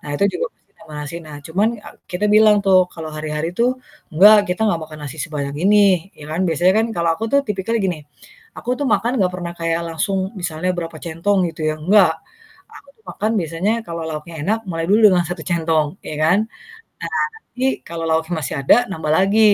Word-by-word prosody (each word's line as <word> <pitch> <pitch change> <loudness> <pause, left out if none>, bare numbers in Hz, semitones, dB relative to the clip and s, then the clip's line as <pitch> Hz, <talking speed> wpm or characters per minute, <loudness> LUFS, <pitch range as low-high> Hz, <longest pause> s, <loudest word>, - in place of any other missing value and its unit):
Nah, - - -11
itu 200 - +1
juga - - -2
pasti - - -41
tambah 155 - -12
nasi, 150 +3 -7
nah, 150 -1 -9
cuman 195 +7 +1 0.2
ak - - -11
kita 180 +3 -3
bilang 215 -1 +6
tuh 190 -1 +6
kalau 160 -2 -7
hari-hari 155 +1 -3
tuh, 235 +1 +4 0.4
"Enggak, 205 +4 +7
kita 180 +4 -2
nggak 170 -6 +1
makan 155 0 -11
nasi 145 +2 -7
sebanyak 140 -3 -4
ini," 200 +3 +4 0.4
ya 145 - -11
kan, 165 - -1
biasanya 175 +4 +3
kan 225 - +1
kalau 170 0 +1
aku 220 - -5
tuh 280 - +5
tipikalnya 210 +3 -1
gini, 175 -4 -2 0.6
aku - - -11
tuh 285 - -1
makan 235 - 0
nggak 180 -1 +2
pernah 175 -1 -5
kayak 165 0 0
langsung 190 +4 -1 0.2
misalnya 175 +1 -2
berapa 165 -2 -5
centong, 170 +5 0
gitu 160 - -10
ya, - - -2
enggak! 185 0 +5 0.6
Aku 280 - -16
tuh 440 - -32
makan 215 +2 -2
biasanya 165 +5 -1
kalau 165 -1 -5
lauknya 160 +1 -6
enak, 215 +7 +1
mulai 165 0 -2
dulu 210 +2 +5
dengan 175 -1 +2
1 175 -2 -5
centong, 160 -3 +1 0.2
iya - - -5
kan. 180 +5 +4 0.6
Nah, - - -4 0.2
nanti 350 - -11 0.2
kalau 165 -1 -5
lauknya 160 +2 0
masih 130 - -4
ada, - - +7 0.2
nambah 160 -4 -2
lagi, 195 +3 +3
170 Hz, 205 wpm, -20 LUFS, 160-200 Hz, 0.6 s, Enggak